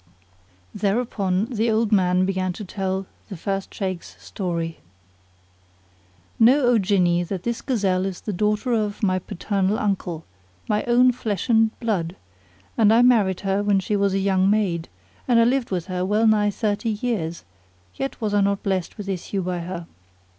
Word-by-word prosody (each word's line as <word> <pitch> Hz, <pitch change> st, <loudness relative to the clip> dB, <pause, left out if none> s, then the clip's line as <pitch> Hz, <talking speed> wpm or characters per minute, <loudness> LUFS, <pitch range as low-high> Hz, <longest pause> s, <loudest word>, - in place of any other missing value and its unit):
Thereupon 200 Hz, -2 st, 0 dB
the 230 Hz, -1 st, -1 dB
old 220 Hz, 0 st, +1 dB
man 185 Hz, -2 st, +3 dB
began 185 Hz, -1 st, -1 dB
to 210 Hz, +3 st, -7 dB
tell 190 Hz, 0 st, -3 dB, 0.2 s
The 195 Hz, -, -6 dB
First 195 Hz, +3 st, -3 dB
Shaykh's 185 Hz, -3 st, -5 dB
Story. 170 Hz, -4 st, -4 dB, 1.6 s
Know 250 Hz, +6 st, +6 dB
O 245 Hz, -3 st, +4 dB
Jinni! 180 Hz, -3 st, +2 dB
that 185 Hz, -2 st, -4 dB
this 235 Hz, -1 st, -2 dB
gazelle 195 Hz, -7 st, 0 dB
is 190 Hz, -2 st, -6 dB
the 210 Hz, -, -4 dB
daughter 210 Hz, +5 st, 0 dB
of 210 Hz, -2 st, -1 dB
my 185 Hz, -2 st, +2 dB
paternal 195 Hz, +3 st, -1 dB
uncle, 180 Hz, -5 st, -2 dB, 0.4 s
my 210 Hz, 0 st, +1 dB
own 245 Hz, +1 st, +5 dB
flesh 220 Hz, -3 st, -3 dB
and 225 Hz, -1 st, +3 dB
blood, 190 Hz, -7 st, -1 dB, 0.6 s
and 215 Hz, -2 st, +6 dB
I 230 Hz, +2 st, +5 dB
married 210 Hz, -7 st, +3 dB
her 195 Hz, 0 st, 0 dB
when 205 Hz, -1 st, +2 dB
she 205 Hz, +2 st, -1 dB
was 200 Hz, -1 st, +1 dB
a -, -, +2 dB
young 190 Hz, -1 st, +2 dB
maid, 190 Hz, -6 st, 0 dB, 0.4 s
and 240 Hz, -2 st, +4 dB
I -, -, +6 dB
lived 250 Hz, +1 st, +1 dB
with 180 Hz, -3 st, -2 dB
her 180 Hz, -1 st, -3 dB
well 210 Hz, +4 st, +2 dB
nigh 210 Hz, -2 st, +4 dB
thirty 205 Hz, +2 st, -1 dB
years, 205 Hz, -7 st, -2 dB, 0.5 s
yet 270 Hz, -, -4 dB
was 215 Hz, -2 st, -2 dB
I 205 Hz, -, +3 dB
not 200 Hz, 0 st, 0 dB
blessed 190 Hz, -1 st, -2 dB
with 205 Hz, -2 st, -7 dB
issue 195 Hz, 0 st, -3 dB
by 180 Hz, 0 st, -2 dB
her. 170 Hz, 0 st, -6 dB
200 Hz, 170 wpm, -23 LUFS, 185-220 Hz, 1.6 s, Know